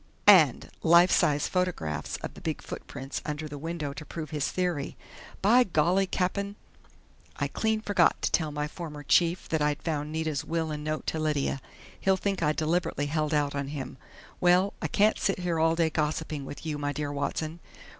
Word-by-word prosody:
And 170 -11 +6
life 170 +2 +6
size 145 -1 +3
photographs 180 - -2
of - - -5
the - - -12
big - - -3
footprints 135 0 -6
under 150 +1 -4
the 145 -1 -7
window 160 -2 -4
to 155 - -8
prove 155 -1 -7
his 150 -2 -1
theory!... 175 -6 -2 0.5
By 240 +5 +6
golly, 180 0 +2
Cap'n! 200 +2 -1 0.8
I - - -1
clean 220 -1 0
forgot 205 -2 +3
to - - +1
tell 155 -3 +1
my 150 0 -2
former 150 -2 -7
chief 170 +4 +2
that 160 -2 0
I'd 150 0 0
found 150 -2 -2
Nita's 155 -2 -2
will 165 -1 -2
and 150 0 -4
note 155 0 -3
to 160 - -2
Lydia! 145 -3 0 0.4
He'll 190 0 +2
think 195 -1 -2
I 150 -2 +3
deliberately 155 -1 0
held 155 +1 -1
out 145 -2 +1
on 140 -1 -2
him.... 135 -3 -6 0.4
Well 180 +2 +4
I 160 - 0
can't 210 +7 +3
sit 195 - +1
here 175 -3 -1
all 165 +1 +3
day 165 -1 +2
gossiping 155 -2 -2
with 145 - -8
you, 150 -2 -2
'my 145 0 -1
dear 145 0 -3
Watson....' 155 +3 -3
155 Hz, 185 wpm, -28 LUFS, 150-175 Hz, 0.8 s, And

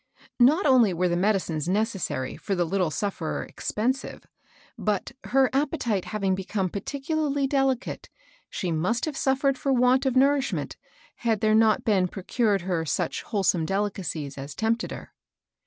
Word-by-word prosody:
Not 295 +10 +5
only 245 -9 +5
were 180 +2 +1
the 175 - +1
medicines 175 -5 0
necessary 195 - -1
for 195 - -3
the 175 -1 +1
little 180 0 0
sufferer 175 -2 -3
expen 230 +5 -1
sive, 270 - -10 0.5
but, 210 -3 -2
her 265 0 +3
appetite 265 - 0
having 195 -3 -1
become 190 0 -2
particu 280 - -4
larly 285 -3 +1
delicate, 270 -2 -1 0.4
she 180 -4 -3
must 185 +9 0
have 310 -3 -4
suffered 270 0 +1
for 275 - 0
want 255 +1 +3
of 260 - 0
nourishment 275 +1 +2 0.4
had 225 -3 0
there 215 0 +3
not 220 0 +4
been 195 -4 +3
procured 200 +2 0
her 175 -2 -1
such 150 - -2
wholesome 190 -5 0
delicacies 180 -7 -3
as 140 +1 -7
tempted 225 +1 0
her. - - -9
215 Hz, 155 wpm, -26 LUFS, 185-265 Hz, 0.5 s, Not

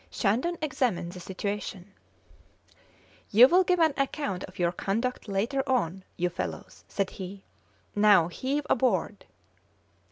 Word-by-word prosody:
Shandon 255 - 0
examined 250 - -1
the 180 - -9
situation. 195 +1 -5 1.4
"You 235 +5 +8
will 360 +5 +5
give 360 -1 +1
an 320 -3 +4
account 270 -9 -2
of 185 - -16
your 175 -1 +1
conduct 225 +7 -2
later 215 +8 0
on, 190 -7 0
you 180 0 +1
fellows," 175 - -6
said 195 -2 -2
he. 190 +1 -8 0.5
"Now 205 -5 +5
heave 275 +10 -2
aboard!" 205 -5 0
205 Hz, 125 wpm, -28 LUFS, 185-260 Hz, 1.4 s, You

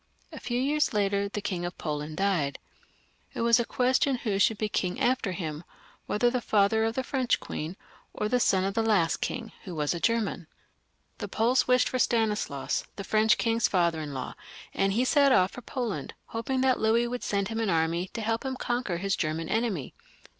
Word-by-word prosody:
A - - -8
few 240 0 -2
years 290 +1 +1
later 200 -1 +1
the 205 - -4
King 185 -4 -2
of 175 0 -5
Poland 150 0 -4
died. 180 -8 0 0.8
It - - -2
was 235 +1 +5
a - - +2
question 255 +3 +2
who 210 -5 -2
should 220 +2 +3
be 215 - -1
king 185 -3 -2
after 245 -5 +1
him, 160 -3 -5 0.4
whether 240 +3 +2
the 250 -1 -1
father 220 +1 +3
of 225 +1 -1
the 260 - -1
French 260 -2 0
queen, 165 +5 -5 0.3
or 210 - -2
the 250 +3 +2
son 190 -5 +3
of 195 +1 -1
the 225 - +1
last 205 -7 +2
king, 225 -2 -4
who 180 -4 -6
was 150 0 0
a 170 - -4
German. 220 -5 0 0.7
The - - -4
Poles 235 +4 +2
wished 250 0 +4
for 255 - -2
Stanislaus, 210 - 0
the 200 - -6
French 215 +2 +3
king's 230 -3 +2
father 170 -4 +1
in 150 -1 -5
law, 130 -2 -5 0.4
and 195 0 +1
he 240 +5 +2
set 280 0 +4
off 185 -7 +4
for 245 - -9
Poland, 240 -5 -4
hoping 255 +3 -2
that 260 -1 +3
Louis 230 +2 +3
would 245 +1 -4
send 200 -1 -1
him 225 0 -3
an 225 -3 0
army 165 +1 +1
to 230 - -2
help 225 +1 -1
him 265 -1 -3
conquer 240 -8 -2
his 195 +2 0
German 160 +1 -2
enemy, 215 - -1
but. - - -32
215 Hz, 205 wpm, -28 LUFS, 180-240 Hz, 0.8 s, was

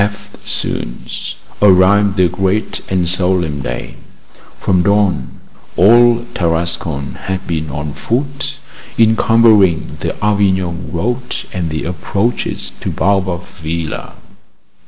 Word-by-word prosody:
EFTSOON 100 -11 -3 0.7
arrived 100 +1 +5
the 90 -2 +4
great 95 +5 -1
and 90 -2 +1
solemn 90 -5 +1
day. - - -5 0.6
From 90 -2 +2
dawn 100 -8 +1 0.4
all 120 +4 +5
Tarascon 80 -4 0 0.2
had 95 0 -3
been 80 -2 -3
on 75 +1 -4
foot, 140 - -2 0.4
encumbering 110 -5 +4
the - - -3
Avignon 95 -4 0
road 120 +8 -2
and 85 -3 -2
the 80 0 -3
approaches 100 +7 -2
to - - -2
Baobab 95 -3 0
Villa. 80 -2 -5
95 Hz, 100 wpm, -16 LUFS, 85-105 Hz, 0.7 s, arrived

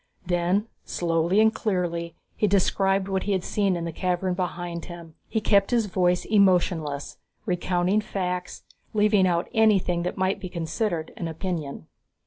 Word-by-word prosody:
Then 180 +4 +1 0.2
slowly 170 +3 +1
and 220 0 +5
clearly, 170 -6 -2 0.2
he 210 - +1
described 195 0 +2
what 190 -1 -1
he 205 - +1
had 185 -2 0
seen 200 -3 +1
in 170 -1 -3
the 170 - -3
cavern 180 +2 -1
behind 175 -2 -4
him. 170 -2 -10
He 220 - 0
kept 200 -2 +3
his 235 -3 +2
voice 180 -2 +1
emotionless, 175 -8 +2 0.3
recounting 180 +2 +1
facts, 180 -3 -4 0.3
leaving 210 -2 +4
out 175 0 0
anything 200 -6 +3
that 175 - -3
might 190 +1 0
be 185 - -6
considered 170 0 -2
an 170 - -3
opinion. 160 - -4
180 Hz, 150 wpm, -25 LUFS, 170-200 Hz, 0.3 s, and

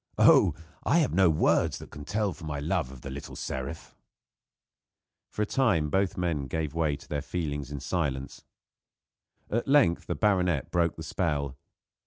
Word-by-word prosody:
Oh! 75 - +6 0.3
I - - +3
have 155 -6 +2
no 95 -2 +5
words 80 - +2
that - - -11
can 75 -1 -9
tell 105 -3 -1
my 75 -2 -3
love 80 0 0
for 65 - -10
the 65 +2 -8
little 70 +1 -7
seraph." 70 +4 -5 1.3
For 105 - -1
a - - +1
time 105 - +1
both 95 -1 +1
the - - -3
men 80 -6 -1
gave 75 +2 -2
way 80 -3 +1
to 70 - -13
their 75 -1 -2
feelings 75 -2 -4
in 70 -2 -5
silence. 70 -4 -2 1.1
At 115 +2 0
length 135 -12 +4
the - - -1
baronet 90 - +1
broke 85 -1 +1
the 80 - -7
spell. 75 -5 -1
80 Hz, 170 wpm, -28 LUFS, 70-90 Hz, 1.3 s, Oh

